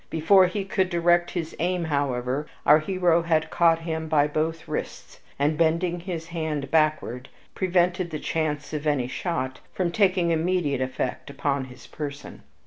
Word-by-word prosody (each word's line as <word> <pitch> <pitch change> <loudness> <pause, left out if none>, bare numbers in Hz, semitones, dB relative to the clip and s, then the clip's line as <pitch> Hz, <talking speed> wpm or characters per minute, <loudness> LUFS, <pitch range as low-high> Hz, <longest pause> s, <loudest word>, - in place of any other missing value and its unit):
Before 185 +4 +5
he 195 +2 -3
could 190 -1 0
direct 175 0 +2
his 165 -3 -4
aim, 180 +1 0
however, 140 -2 -1 0.2
our 150 +2 +7
hero 175 0 +2
had 160 -1 0
caught 165 -1 +3
him 160 -1 -3
by 150 -2 +3
both 160 +2 -2
wrists, - - -6 0.2
and, 150 +3 +1
bending 170 +2 +1
his 170 -2 -6
hand 155 -4 -3
backward, 155 -5 +1 0.2
prevented 180 -1 +1
the 155 - -4
chance 150 -1 -2
of 150 0 -3
any 145 -4 +1
shot 130 -2 -3
from 180 -2 -1
taking 185 -3 +2
immediate 165 -4 0
effect 130 +1 -3
upon 140 -1 -1
his 125 -1 -13
person. 145 -2 -7
160 Hz, 155 wpm, -25 LUFS, 145-175 Hz, 0.2 s, our